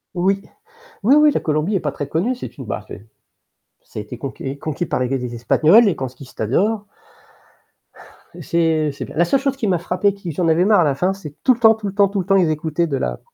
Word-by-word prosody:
Oui. 195 +3 +1 0.6
Oui, 255 +7 +5
oui 300 0 +6
la - - +1
Colombie 155 +6 -1
est - - +2
pas 150 -3 -3
très 145 - -5
connue, 185 - -1
c'est 245 - -9
une 135 - -8
bah, 105 0 -5
c'est 95 - -10 0.8
ça - - -8
a - - -4
été 110 +4 -9
conquis 135 +1 -6
conquis 155 +4 -3
par - - -2
l'Église 125 -1 -2
espagnole, 155 - +4
les 200 -5 +2
conquistadors. 135 - -2 1.6
C'est 160 -3 +1
c'est 140 - -7
bien. - - -12
La 175 - +4
seule 270 +10 +2
chose 275 0 -1
qui 225 - -2
m'a 185 -3 +2
frappé, 200 +4 0
qui 190 -4 -7
j'en 165 +3 -1
avais 165 +3 +3
marre 210 -3 +5
à - - +4
la 145 -3 +1
fin, 180 +7 0
c'est 155 -7 -10
tout 255 - +5
le 240 - -9
temps, 225 -1 +6
tout 215 -2 -6
le 195 - -5
temps, 200 0 +4
tout 200 +1 -3
le 185 - -2
temps, 195 +1 +2
ils 180 -4 +3
écoutaient 155 +2 -1
de 140 -3 -2
la, - - -3
170 Hz, 240 wpm, -20 LUFS, 140-200 Hz, 1.6 s, oui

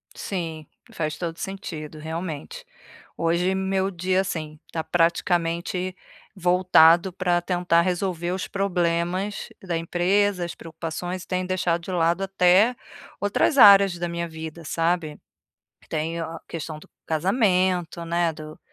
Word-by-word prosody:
Sim, 165 -5 -5 0.2
faz 155 -1 -3
todo 170 -2 -4
o - - -17
sentido, 160 -6 -6
realmente. 165 - -6 0.5
Hoje 170 +3 +1
meu 190 0 0
dia, 185 +1 +1
assim, 155 -5 -5
tá 160 - -2
praticamente 170 +2 0 0.4
voltado 180 -1 +5
pra 175 -1 +1
tentar 175 -1 +2
resolver 175 -1 -1
os 185 0 -3
problemas 180 0 -1
da 175 -3 -2
empresa, 180 +3 +1
as 170 - -7
preocupações, 165 +3 -5
e - - -17
tenho 185 0 -2
deixado 175 -2 0
de 185 - -7
lado 175 +1 +1
até 195 +4 +4 0.5
outras 205 +8 +1
áreas 200 -5 +8
da 175 0 -2
minha 170 0 -3
vida, 160 0 -8
sabe. 165 -1 -1 0.7
Tenho 165 +1 -2
a 165 0 -8
questão 155 -1 -6
do - - -17 0.2
casamento, 180 -1 +1
né, 170 0 +1
do 155 0 -10
175 Hz, 130 wpm, -24 LUFS, 165-185 Hz, 0.7 s, áreas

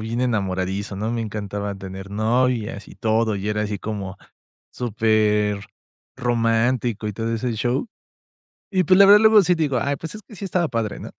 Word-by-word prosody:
bien 115 +2 -3
enamoradizo, 100 -4 -1
¿no? 110 +3 -2
Me 115 -1 -2
encantaba 100 -1 -4
tener 95 0 -8
novias 110 0 0
y - - -13
todo, 110 0 +1
y 100 +1 -3
era 105 0 0
así 105 -1 -3
como 100 -2 -5 0.6
súper, 105 -3 +1 0.5
romántico 120 -1 0
y 105 - -5
todo 115 +2 -2
ese 120 +1 -2
show. 120 - -1 0.8
Y, 185 -2 +2
pues, 185 - +5
la 200 - +9
verdad 205 +1 +8
luego 220 -2 +7
sí, 180 - +3
digo: 150 -5 0
"Ay, 140 0 -1
pues, 165 +7 -7
es 215 - -9
que 215 - -13
sí 200 - -6
estaba 175 -4 0
padre, 115 -3 -2
¿no?". - - -8
115 Hz, 180 wpm, -22 LUFS, 105-125 Hz, 0.8 s, la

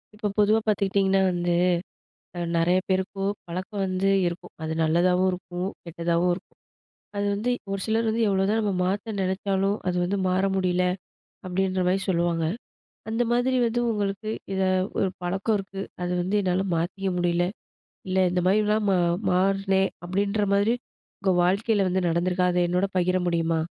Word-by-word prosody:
இப்போ 210 0 -2
பொதுவா 210 +1 +4
பார்த்துக்கிட்டிங்கன்னா, 195 -1 +2
வந்து 175 0 0 0.8
அ - - -3 0.2
நிறைய 175 +2 +3
பேருக்கும் 195 +1 0 0.2
பழக்கம் 185 +4 -4
வந்து 185 +1 0 0.2
இருக்கும். 175 +1 -5
அது 160 0 -2
நல்லதாவும் 180 +3 +3
இருக்கும். 180 +1 -4
கெட்டதாவும் 170 +1 0
இருக்கும். 175 - -14 0.6
அது 200 0 0
வந்து 215 +5 -1 0.2
ஒரு 195 0 -2
சிலர் 225 +1 +1
வந்து 225 +1 +1
எவ்ளோதான் 195 +3 +2
நம்ம 205 -2 0
மாத்த 205 +4 -2
நினைச்சாலும், 195 +1 0
அது 180 - 0
வந்து 190 +3 -1
மாற 185 +1 +1
முடியல 180 -1 +1 0.6
அப்படின்ற 185 +1 0
மாரி 190 +2 +2
சொல்லுவாங்க. 170 -2 +1 0.6
அந்த 225 +2 0
மாதிரி 250 +2 +2
வந்து 235 +1 0
உங்களுக்கு 205 0 -2 0.2
இத 190 - 0 0.4
ஒரு 195 - +2
பழக்கம் 195 +5 0
இருக்கு. 195 0 -6 0.2
அது 180 0 -1
வந்து 190 +4 0
என்னால 185 0 +1
மாத்திக்க 190 +4 -2
முடியல. 175 0 +1 0.6
இல்ல 185 0 0
இந்த 180 0 +1
மாதிரிலாம் 210 +2 +2
மா 190 - +3 0.3
மாறுனேன், 195 +1 +2
அப்படின்ற 200 +3 0
மாதிரி 205 +4 +3 0.5
உங்க 195 -1 +2
வாழ்க்கையில 200 +2 +2
வந்து 185 0 0
நடந்திருக்கா? 180 +2 +1
அத 180 - +1
என்னோட 180 +3 +1
பகிர 180 +1 +2
முடியுமா? 165 -1 +1
190 Hz, 150 wpm, -25 LUFS, 180-200 Hz, 0.8 s, பொதுவா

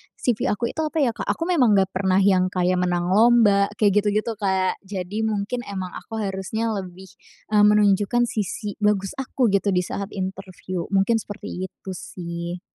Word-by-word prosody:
CV 240 -4 0
aku 230 +3 -1
itu - - -9
apa 310 - -4
ya, 240 - +2
Kak, - - -7
aku 330 - -1
memang 250 - +4
nggak 190 -1 +2
pernah 190 0 +2
yang 185 -2 +4
kayak 180 0 +1
menang 175 0 0
lomba, 210 -2 +5
kayak 205 -1 +3
gitu-gitu, 215 +2 0
Kak. 190 -2 0
Jadi 195 +3 -3
mungkin 210 +3 -2
emang 190 -2 -5
aku 225 - -8
harusnya 200 +4 -2
lebih, 190 -2 -6 0.4
eee, 210 -1 +5
menunjukkan 210 +3 +3
sisi 210 0 -4
bagus 205 -2 +1
aku 255 -3 0
gitu 200 0 +1
di 180 - +2
saat 200 +2 -4
interview, 185 -2 -5
mungkin 195 +4 +3
seperti 190 -3 -6
itu 190 - -10
sih. 170 0 -6
200 Hz, 170 wpm, -23 LUFS, 185-215 Hz, 0.4 s, lomba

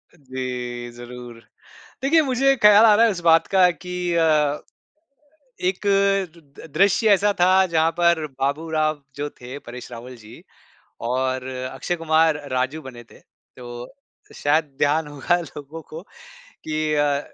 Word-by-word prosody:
जी, 125 -4 -6
ज़रूर 120 -1 -11 0.6
देखिए, 315 +4 +4
मुझे 270 -1 +2
एक 270 - -4
ख़्याल 210 +1 +8
आ 215 -2 +7
रहा 225 +3 +5
है - - +2
इस 180 - -6
बात 165 -1 +4
का 185 -2 +4
कि 180 +1 -7 0.2
अ, 155 -3 +2 1.0
एक 185 +1 -1 0.9
दृश्य 200 +3 +3
ऐसा 205 +1 +2
था 185 +2 +5
जहाँ 160 0 +3
पर 170 -2 +2
बाबू 140 +4 -1
राव 155 -2 -1
जो 145 +1 -4
थे, 125 0 -10
परेश 125 -2 -10
रावल 120 +2 -9
जी 115 -1 -15 0.6
और 130 +1 -1 0.3
अक्षय 135 +7 -3
कुमार 160 -1 +2
राजू 130 +5 -1
बने 125 -3 -10
थे - - -19
तो 120 - -12 0.4
शायद 155 +2 +1
ध्यान 150 +2 +1
होगा 145 +4 0
लोगों 155 -1 -9
को 160 - -8 0.6
की 155 0 -2
अ, 145 -1 +1
155 Hz, 140 wpm, -22 LUFS, 130-175 Hz, 1.0 s, ख़्याल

